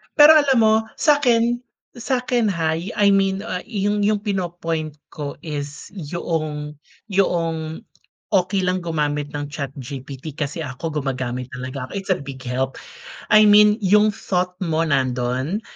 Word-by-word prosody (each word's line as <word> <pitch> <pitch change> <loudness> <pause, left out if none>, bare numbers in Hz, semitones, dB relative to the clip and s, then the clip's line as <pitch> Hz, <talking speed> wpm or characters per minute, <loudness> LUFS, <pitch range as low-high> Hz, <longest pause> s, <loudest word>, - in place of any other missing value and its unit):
Pero 295 0 +9
alam 285 -4 +4
mo, 220 0 +5 0.2
sa'kin 240 -6 +3 0.4
sa'kin 245 -2 0
hay, 165 0 -1
I 205 - +5
mean, 195 -1 +3
ah 185 -5 -4
yung 205 -2 -1
yung 210 0 +2
pino-point 175 -6 -3 0.2
ko 145 -2 -6
is 145 -1 -6
'yong 155 -3 -4 0.3
'yong 165 -4 -1 0.5
okey 190 +1 +2
lang 185 0 0
gumamit 150 -3 -1
ng 145 -1 -4
ChatGPT. 140 0 -7
Kasi 150 +1 -3
ako 150 +2 -4
gumagamit 130 -2 -3
talaga 130 +1 -5
ako, - - -16
it's 195 -1 -3
a 185 - +2
big 135 -2 -9
help. 130 +2 -2 0.5
I 215 0 +7
mean, 210 0 +6
yung 210 0 +4
thought 180 -3 -2
mo, 160 -2 0
nando'n. 130 - 0
165 Hz, 135 wpm, -21 LUFS, 145-205 Hz, 0.5 s, Pero